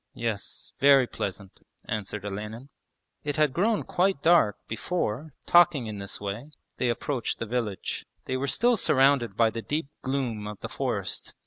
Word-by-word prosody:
'Yes, 115 -4 -3
very 140 -2 +7
pleasant,' 100 -4 -6 0.3
answered 105 -1 -4
Olenin. 105 +6 -6 0.5
It 145 -1 -2
had 150 -3 +3
grown 210 +6 +2
quite 185 -4 +1
dark 165 - +5
before, 140 +2 -3
talking 175 -7 +5
in 105 -2 -5
this 100 -1 -6
way, 105 +8 -5 0.3
they 125 - +1
approached 120 +1 -1
the - - -3
village. 110 -4 -3 0.2
They 130 - -2
were 135 +2 -1
still 240 - +3
surrounded 135 - +3
by 115 -1 +4
the 115 - -4
deep 150 +3 -2
gloom 125 -6 -2
of 105 -1 -7
the - - -5
forest. 110 -9 -2
125 Hz, 155 wpm, -27 LUFS, 105-145 Hz, 0.5 s, very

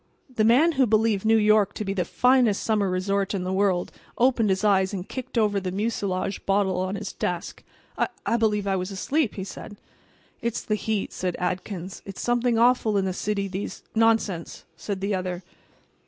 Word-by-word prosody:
The 215 - +2
man 255 +10 +5
who 270 -5 +2
believed 220 -1 +2
New 225 0 +5
York 215 -1 +3
to 210 - -4
be 195 - -1
the 180 -3 -1
finest 250 -1 +3
summer 210 -3 +1
resort 195 +2 0
in 185 - -2
the 185 +1 -2
world 190 -2 +1 0.3
opened 240 -3 +3
his 190 +1 0
eyes 195 -1 +3
and 185 0 -5
kicked 260 -1 -6
over 210 -3 +2
the 185 -1 -4
mucilage 200 -2 -2
bottle 195 -2 +2
on 185 +2 -2
his 205 -1 -5
desk. 175 -1 -4 0.4
"I—I 235 - -1
believe 210 -3 +1
I 195 -1 +1
was 185 0 -2
asleep," 245 +7 -1
he 190 - -4
said. 205 +1 -9 0.6
"It's 235 0 -2
the 215 - -1
heat," 215 -1 -2
said 180 -1 -2
Adkins. 185 +1 -4
"It's 195 -2 -9
something 240 -1 +1
awful 230 -3 +3
in 195 - +1
the 185 - -1
city 200 +1 -2
these"— 190 +1 -6
"Nonsense!" 220 -6 +1
said 190 +4 -5
the 200 +1 -1
other. 185 -1 -3
200 Hz, 185 wpm, -25 LUFS, 190-225 Hz, 0.6 s, man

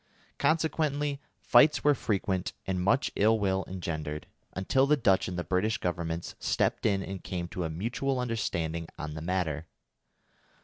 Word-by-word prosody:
Consequently 150 -3 +1 0.2
fights 150 +1 +5
were 145 - +6
frequent 95 -6 -1
and 95 -1 -1
much 100 +9 +2
ill 110 +2 +4
will 95 -2 +1
engendered, 80 -4 -4 0.3
until 130 +8 +2
the 150 +1 +4
Dutch 95 -7 +3
and 90 - -4
the 90 - -1
British 95 +5 +1
Governments 85 -1 -3
stepped - - +1
in 100 -2 +1
and 95 -1 -6
came 90 -2 -3
to 90 -1 -3
a - - -2
mutual 120 +10 -1
understanding 85 -9 -2
on 75 0 -5
the 80 - -6
matter. 80 -3 -1
95 Hz, 150 wpm, -29 LUFS, 85-120 Hz, 0.3 s, were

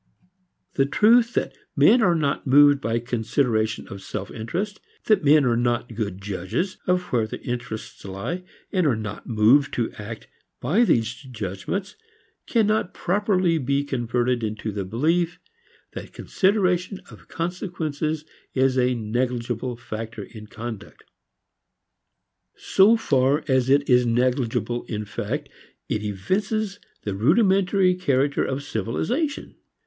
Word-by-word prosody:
The 135 -1 +2
truth 230 - +4
that - - -1 0.2
men 245 - +6
are 175 -5 +4
not 145 -3 -1
moved 145 +1 +6
by 115 +2 0
consideration 115 -1 0
of 100 - -8
self 100 0 -6
interest, 180 - -4 0.3
that 215 -6 +3
men 150 0 +5
are 120 -2 +2
not 120 0 0
good 105 -4 -3
judges 100 - -3
of 180 0 +2
where 115 -3 +2
their - - -6
interests 120 -3 -5
lie 100 - -5 0.3
and 185 -5 +2
are 130 - +3
not 105 -1 -6
moved 120 +6 +4
to 115 -2 -1
act 110 +1 -8 0.3
by 190 - +3
these 115 - +2
judgments, 120 - -5 0.5
cannot 215 -5 +1
properly 185 -3 +1
be 140 +1 0
converted 125 -2 -1
into 110 0 -3
the 100 -2 -4
belief 165 - 0 0.5
that - - -8
consideration 185 -1 +1
of - - -15
consequences 160 -3 -3 0.3
is 130 0 +3
a 125 0 +2
negligible 120 +1 -2
factor 115 -2 -6
in 105 0 -11
conduct. 115 -1 -8 1.5
So 210 +4 +4
far 140 -6 +2
as 130 -2 +2
it 140 +1 +4
is 125 -2 +4
negligible 120 0 0
in 105 -2 -4
fact 105 - -4 0.4
it 105 - -1
evinces 195 - -2 0.2
the 100 - -2
rudimentary 190 - +3
character 140 -6 +1
of 135 +1 -3
civilization. 165 - -2
130 Hz, 130 wpm, -24 LUFS, 115-180 Hz, 1.5 s, men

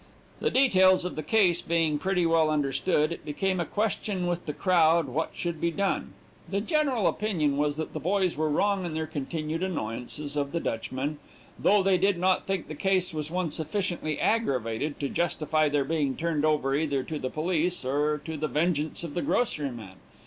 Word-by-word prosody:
"The - - +1
details 190 -9 +4
of 180 - -4
the 155 - -3
case 180 -1 +3
being 160 -3 +1
pretty 185 -1 +1
well 165 -1 +3
understood, 150 +2 +1
it 170 - -6
became 185 +5 -1
a 170 - 0
question 205 -3 -1
with 175 -1 -2
the - - 0
crowd 170 -1 +3
what 145 +5 -2
should 170 -3 -3
be 170 - +2
done. 195 +3 -1 0.4
The 200 - 0
general 270 - +1
opinion 170 -9 +1
was 145 +1 0
that 160 - -4
the - - -3
boys 185 0 +1
were 155 +1 0
wrong 200 +5 +1
in 170 -3 -4
their 160 0 -1
continued 155 +2 -4
annoyances 145 -3 -4
of 140 0 -1
the 170 - 0
Dutchman, 135 +4 -3 0.4
though 205 -1 +4
they 190 -1 +3
did 195 0 +2
not 185 +1 +1
think 195 -3 -2
the 155 - -6
case 185 +2 0
was 155 -1 -3
one 175 -2 -1
sufficiently 160 -1 -2
aggravated 140 - 0
to 140 - -1
justify 155 -1 +1
their 145 -1 +1
being 145 -3 0
turned 160 -2 0
over 150 -3 +2
either 140 -3 0
to 155 +1 -5
the 130 - -3
police 170 0 -1
or 145 +3 +1
to 160 -1 -4
the 155 +1 -1
vengeance 155 +2 0
of 165 -4 -5
the 175 - -1
grocery 150 - 0
man. 105 -7 -10
160 Hz, 190 wpm, -27 LUFS, 150-185 Hz, 0.4 s, details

